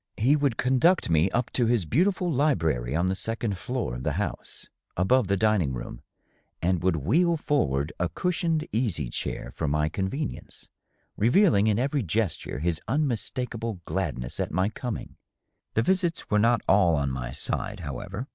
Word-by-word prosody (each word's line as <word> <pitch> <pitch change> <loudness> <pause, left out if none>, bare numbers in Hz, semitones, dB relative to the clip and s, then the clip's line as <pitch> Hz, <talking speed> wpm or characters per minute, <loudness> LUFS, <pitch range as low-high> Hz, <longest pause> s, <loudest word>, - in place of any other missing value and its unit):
He 130 +7 +4
would 140 -6 +1
con 130 +1 +2
duct 175 - +3
me 80 +3 +4
up 120 +4 -1
to 120 -3 +1
his 115 -6 +2
beautiful 180 - +1
library 80 - +1
on 85 +2 +1
the 95 - +1
second 110 +1 -2
floor 125 - -3
of 60 - -5
the - - -1
house, - - -4 0.3
above 100 +6 +3
the 100 +1 +1
dining 95 -9 +2
room, - - -7 0.6
and 90 -1 +1
would 90 -1 +2
wheel 160 - +2
forward 75 - 0
a 90 -1 0
cushioned 165 - -1
easy 95 - -1
chair - - -4
for 80 - -2
my 75 +1 +1
convenience, 100 - -4 0.5
revealing 120 - +4
in 105 -2 +2
every 140 +3 0
gesture 100 - -2
his 80 +2 -1
unmistakable 120 -5 -2
glad - - -2
ness 60 0 -6
at - - -1
my 95 +5 +1
coming. 120 0 -6 0.6
The 115 - +3
visits 180 -2 0
were 105 - +4
not 115 +1 +3
all 90 -4 +5
on 70 -2 0
my 65 -1 -4
side, - - -3
however. 105 +8 -5
110 Hz, 170 wpm, -26 LUFS, 85-130 Hz, 0.6 s, all